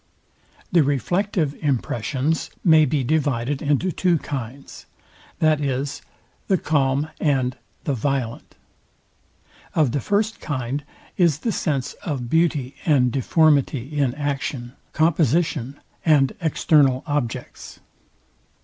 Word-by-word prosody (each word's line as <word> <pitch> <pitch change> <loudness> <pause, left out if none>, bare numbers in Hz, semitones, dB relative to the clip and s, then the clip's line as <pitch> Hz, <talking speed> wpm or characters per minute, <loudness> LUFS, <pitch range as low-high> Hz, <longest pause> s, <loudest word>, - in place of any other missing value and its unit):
The 170 - +5
reflective 155 - 0
impressions 135 +2 -1
may 160 -3 +6
be 140 0 0
divided 140 -2 0
into 150 +5 +1
two 175 0 +2
kinds, 135 -2 -7 0.5
viz. 145 -3 0 0.5
the 190 - +3
calm 140 -1 +1
and 130 -4 +1 0.3
the 145 - -1
VIOLENT. 130 -1 -3 1.2
Of 150 -6 +3
the 145 - 0
first 210 - 0
kind 135 -1 -3 0.3
is 170 -6 +3
the 230 - 0
sense 140 -9 -1
of 130 -7 -4
beauty 155 -5 +1
and 130 -6 +3
deformity 140 0 +2
in 135 -4 +1
action, 140 -4 -3 0.2
composition, 155 -4 +1 0.2
and 145 -5 +4
external 145 -4 +3
objects. 145 -6 -4
145 Hz, 105 wpm, -22 LUFS, 130-155 Hz, 1.2 s, may